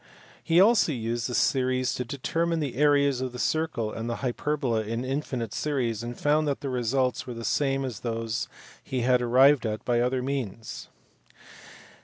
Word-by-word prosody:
He 165 0 +3
also 200 -4 +5
used 115 0 -2
the 125 - -2
series 130 -1 +1
to 125 - -2
determine 165 +6 -1
the 140 -6 -3
areas 140 -2 +3
of 130 -1 -3
the - - -6
circle 140 -7 -1
and 115 +1 -4
the 120 - -1
hyperbola 125 -2 0
in 115 +3 -3
infinite 130 -5 -3
series, 125 -7 -1
and 120 0 -6
found 150 +1 +2
that 140 - -1
the 140 - -3
results 125 +1 0
were 125 - -5
the 115 0 -6
same 135 -1 +1
as 125 -6 -5
those 115 -1 -3 0.4
he 130 -2 -2
had 125 +1 +3
arrived 130 +4 +5
at 110 -2 -3
by 120 -1 +2
other 125 +1 0
means. 125 -5 -4
130 Hz, 175 wpm, -27 LUFS, 120-140 Hz, 0.4 s, also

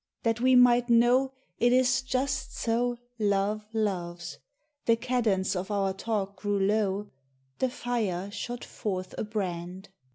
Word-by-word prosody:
That 230 0 +1
we 255 0 +5
might 245 0 +6
know 245 +3 +4 0.3
It 240 +1 +4
is 250 -1 +4
just 260 +1 -2
so 240 +1 0 0.2
Love 205 +1 0
loves, 175 -6 -3 0.5
the 230 - +6
cadence 230 -6 0
of 185 +2 -3
our 195 -2 0
talk 200 -1 -3
grew 205 +1 -1
low, 205 0 0 0.5
The 260 - +2
fire 215 -7 -2
shot 240 +3 -5
forth 185 -4 -4
a - - 0
brand. 185 -3 -4
215 Hz, 135 wpm, -28 LUFS, 195-245 Hz, 0.5 s, might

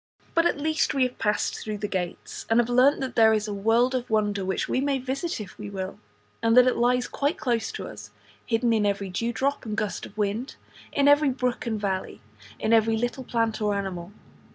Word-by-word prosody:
But 335 0 +4
at 290 - -1
least 310 0 0
we 270 - +3
have 250 0 -2
passed 210 -1 0
through 215 -1 -4
the 210 0 -3
gates, 180 -3 -5
and 225 +1 +4
have 240 0 +2
learnt 255 +4 +4
that 265 - -4
there 220 -1 +6
is 215 0 0
a 210 - -3
world 225 +5 +2
of 250 -1 -2
wonder 210 -2 +1
which 190 0 -1
we 255 - 0
may 280 -1 +1
visit 275 +6 -3
if 200 -3 -8
we 210 -1 -6
will; 190 -1 -5 0.4
and 230 +1 +3
that 250 - +9
it 255 - +2
lies 245 +1 +2
quite 285 +3 -1
close 235 -3 -1
to - - -5
us, 105 -1 -10 0.3
hidden 230 +1 +1
in 220 -2 +2
every 200 -2 -1
dewdrop 235 +8 -1
and 215 -3 -4
gust 215 -2 -2
of 200 - -19
wind, 215 +6 -2 0.4
in 280 0 +2
every 290 0 +5
brook 250 -1 -2
and 220 -2 -1
valley, 190 -2 -3 0.4
in 220 - +1
every 225 0 +4
little 245 +3 -2
plant 230 -2 -1
or 210 -1 +1
animal. 190 -3 -4
225 Hz, 220 wpm, -26 LUFS, 205-255 Hz, 0.4 s, that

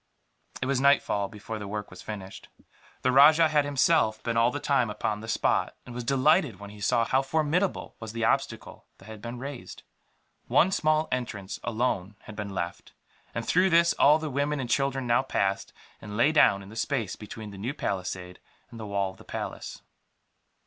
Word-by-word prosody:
It - - 0
was 135 -1 0
nightfall 135 -7 +3
before 110 +1 -7
the 100 - -6
work 105 0 -5
was 95 - -11
finished. 100 -3 -8 0.5
The 130 - +3
rajah 155 +4 +7
had, 150 -2 +2
himself, 145 -5 +2
been 115 - -1
all 115 +1 +4
the 145 - -4
time 135 -6 +1
upon 105 0 -2
the 110 - -9
spot; 110 - 0
and 125 - -9
was 120 0 -5
delighted 140 - +2
when 100 0 -9
he 105 0 -13
saw 115 +3 +2
how 130 +3 +2
formidable 160 +6 -1
was 110 -1 -7
the 115 0 -1
obstacle - - -2
that - - -17
had 110 0 -10
been 120 +2 -6
raised. 135 0 -8 0.6
One 190 - +4
small 155 -3 +2
entrance, 115 -6 -4
alone, 110 -4 -1
had 110 - -11
been 105 -1 -5
left; 85 -3 -5 0.4
and 115 -1 -3
through 185 +2 +3
this 170 0 +4
all 150 +2 +6
the 155 -2 -5
women 145 +2 0
and 125 -3 -4
children 135 -1 0
now 120 +1 +3
passed, 100 -7 -1 0.3
and 105 0 -7
lay 135 +6 +4
down 100 -10 +4
in 95 - -12
the 110 - -11
space 115 -4 -2
between 105 0 -9
the 100 - -10
new 125 +8 -3
palisade 90 -1 -4 0.3
and 115 - -10
the 110 - -6
wall 100 -1 -1
of 95 - -18
the - - -14
palace. - - -6
120 Hz, 195 wpm, -27 LUFS, 105-140 Hz, 0.6 s, rajah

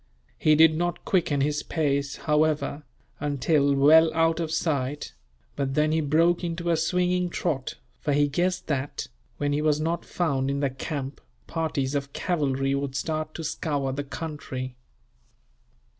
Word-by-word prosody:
He 155 0 +5
did 160 0 +6
not 175 +2 -2
quicken 160 -7 +1
his 150 +1 +1
pace, 140 -3 -1
however, 150 -1 +1 0.4
until 145 0 +2
well 160 +4 +6
out 165 0 +2
of 165 -2 -2
sight; 150 -4 -1 0.4
but 135 -1 -2
then 155 0 +3
he 160 0 +2
broke 165 +4 +2
into 170 0 -1
a - - +4
swinging 180 +2 +1
trot, 150 -7 -2 0.2
for 150 - -1
he 145 +1 +3
guessed 175 +5 0
that, 140 - -3 0.3
when 145 0 0
he 145 - +1
was 150 -1 +2
not 165 +2 -1
found 140 -6 -1
in 140 0 -1
the 140 -2 0
camp, 135 +1 -5 0.2
parties 155 -5 -2
of 140 -1 -3
cavalry 135 -5 0
would 140 -1 -2
start 155 +1 -2
to 165 - -5
scour 145 -3 -2
the 145 +2 -3
country. 135 -4 -6
150 Hz, 155 wpm, -26 LUFS, 140-165 Hz, 0.4 s, did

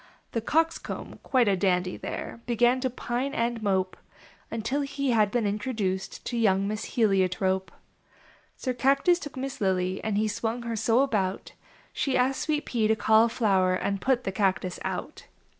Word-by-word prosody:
The 230 - -1
Coxcomb, 325 +7 -1
quite 255 -4 +2
a 200 - +4
dandy 180 -1 +1
there, 230 - -6
Began 240 +2 +3
to 260 0 0
pine 250 +2 -3
and 235 0 -1
mope, 190 -3 0 0.5
Until 230 +6 -1
he 275 -1 -1
had 215 -3 +3
been 230 +1 0
introduced 205 -3 -2
To 240 - -3
young 195 -3 +2
Miss 215 +1 -3
Heliotrope. 190 -3 +1 0.9
Sir 255 - -2
Cactus 275 +8 +3
took 290 -6 -8
Miss 270 -1 -5
Lily, 185 -1 0
And 215 -2 -1
he 215 +1 +2
swung 225 +3 -2
her 230 -1 -3
so 225 +3 +3
about 200 -8 -1 0.4
She 275 - 0
asked 260 +2 +1
Sweet 300 -2 -1
Pea 225 -3 +1
to 220 - +3
Cauliflower 220 -4 +3
And 200 +1 -2
put 255 -1 +1
the 195 - -2
Cactus 190 -2 0
out. - - -5
225 Hz, 160 wpm, -27 LUFS, 195-255 Hz, 0.9 s, a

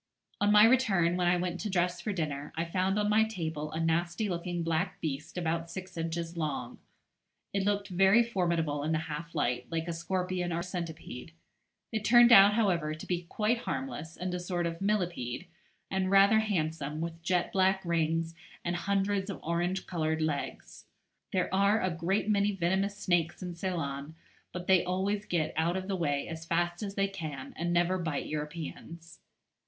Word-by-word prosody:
On 205 0 +3
my 210 +1 +8
return, 205 -9 +3
when 180 -1 +1
I 175 +1 +4
went 180 0 -2
to 215 - -3
dress 180 -1 0
for 215 - -2
dinner, 150 -6 -3
I 165 +1 -1
found 185 +3 0
on 210 0 +1
my 215 +1 +4
table 160 -8 -4
a 160 - -3
nasty 170 +5 0
looking 175 -1 -2
black 165 -1 -1
beast 150 +2 -4
about 165 -1 -1
six 185 0 -7
inches 165 +1 -3
long. 145 -7 -3 0.7
It 195 -1 0
looked 205 -1 0
very 195 +5 +5
formidable 170 -9 0
in 155 +2 0
the - - +2
half 165 +3 -6
light, 125 -4 0
like 165 0 -2
a 170 - -2
scorpion 180 +1 -2
or 170 +1 -1
centipede. 170 -5 -6 0.6
It 220 -2 -2
turned 240 +1 +7
out, 200 -1 +9
however, 170 -9 +1
to 155 - -9
be 175 -1 -2
quite 225 +2 +1
harmless, 200 - -5
and 180 0 -3
a 180 - -2
sort 175 -1 -2
of 165 +1 -4
millipede, 175 - -1 0.5
and 190 -1 0
rather 200 +3 +6
handsome, 160 -8 -1
with 165 0 -4
jet 180 +1 0
black 190 0 +2
rings, 165 -1 0 0.3
and 175 0 0
hundreds 200 +2 0
of 195 - -5
orange 175 +3 -1
coloured 160 -2 -1
legs. 155 -2 -4 0.5
There 185 -1 0
are 200 +3 +4
a 185 - 0
great 175 +5 0
many 205 -1 +2
venomous 195 +2 0
snakes 175 -2 0
in 180 -1 -4
Ceylon, 160 -5 -4 0.4
but 180 0 -6
they 185 -1 +5
always 195 +3 -1
get 160 -5 -1
out 170 +3 +1
of 190 0 -5
the 195 - -1
way 145 -5 -1
as 160 -1 -6
fast 175 +1 0
as 200 -1 -4
they 195 0 +2
can, 155 -8 -6
and 170 +1 -2
never 175 +2 +2
bite 160 -5 -2
Europeans. 160 +1 -6
175 Hz, 180 wpm, -30 LUFS, 165-195 Hz, 0.7 s, out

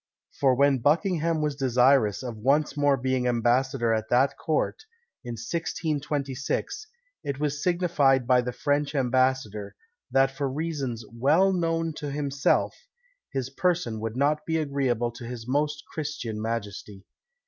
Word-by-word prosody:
For 135 -2 +4
when 140 0 +3
Buckingham 165 - +1
was 150 -2 -1
desirous 130 -4 +3
of 120 -3 -5
once 140 +8 +1
more 145 -1 +3
being 130 0 0
ambassador 120 0 +2
at 110 0 -2
that 130 +3 +3
court, 160 - -1 0.4
in 120 -2 -5
1626, 150 - -3 0.4
it 140 -1 -3
was 145 -1 -1
signified 165 -8 +2
by 125 0 +4
the 125 0 -3
French 145 +4 -1
ambassador, 130 -6 0 0.3
that 135 +1 +3
for 135 0 -2
reasons 135 -6 -3
well 155 +11 +3
known 165 -2 0
to 145 - -4
himself, 140 -1 0 0.6
his 135 -1 -3
person 165 -8 0
would 110 +2 -4
not 150 +2 +1
be 160 +1 -1
agreeable 135 -6 0
to 120 - -11
his 120 -1 -7
most 145 +2 0
Christian 130 -8 -5
majesty. 105 -3 -5
135 Hz, 135 wpm, -26 LUFS, 120-150 Hz, 0.6 s, For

